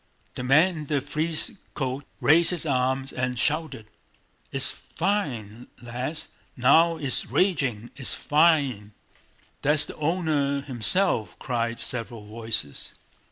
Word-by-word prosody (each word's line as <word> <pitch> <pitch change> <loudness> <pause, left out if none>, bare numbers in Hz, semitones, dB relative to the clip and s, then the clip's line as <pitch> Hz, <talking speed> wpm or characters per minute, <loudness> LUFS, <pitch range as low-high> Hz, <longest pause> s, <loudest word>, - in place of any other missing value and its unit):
The - - -6
man 155 +7 +4
in 150 - -6
the 145 -1 +1
frieze 160 - -1 0.2
coat 135 0 -3 0.2
raised 165 +3 +5
his 175 -3 -1
arms 130 -1 0
and 125 0 -2
shouted: 150 -4 -1 0.7
"It's - - -1
fine, 125 - -3
lads! 125 +6 -4 0.3
Now 165 +7 +5
it's 140 -5 -1
raging... 135 - 0
It's 130 - 0
fine!" 145 -10 +2 0.7
"That's 150 +1 +4
the - - -9
owner 150 -3 0
himself," 135 - +2
cried 115 -2 -2
several 115 -3 -4
voices. 110 -8 -3
140 Hz, 115 wpm, -25 LUFS, 120-160 Hz, 0.7 s, raised